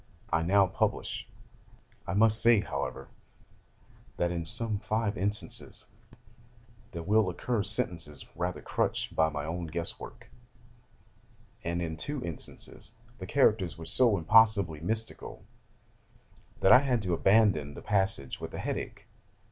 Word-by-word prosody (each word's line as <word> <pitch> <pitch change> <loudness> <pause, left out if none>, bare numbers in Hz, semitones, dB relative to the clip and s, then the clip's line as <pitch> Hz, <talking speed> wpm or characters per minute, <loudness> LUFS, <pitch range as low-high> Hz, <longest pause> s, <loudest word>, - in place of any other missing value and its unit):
I 80 - +2
now 100 +4 +3
publish. 90 - -3 0.8
[I - - -3
must 110 +1 +6
say, 115 -3 +5
however, 65 -8 -5 1.1
that 85 0 0
in 85 -1 -4
some 110 +5 +4
five 110 0 -2
instances 100 +3 -2 1.1
there 85 -2 -7
will 105 +1 +2
occur 110 +5 -2
sentences 85 -5 -1
rather 90 -1 -4
crutched - - -2
by 80 0 +2
my 75 -1 -5
own 85 +2 -5
guess 85 +1 -5
work; - - -11 1.4
and 85 +1 -3
in 80 -1 -5
two 140 - -2
instances 85 +5 -8 0.3
the 95 - -7
characters 105 -9 +1
were 80 - -9
so 110 +5 +5
impossibly 100 -3 +4
mystical, 110 +7 -4 1.2
that 95 - +4
I 125 - +9
had 125 -5 -1
to 90 -2 -2
abandon 90 -7 +2
the - - -10
passage 95 -9 -1
with - - -7
a - - -6
head - - -3
ache. - - -10
95 Hz, 135 wpm, -29 LUFS, 85-110 Hz, 1.4 s, I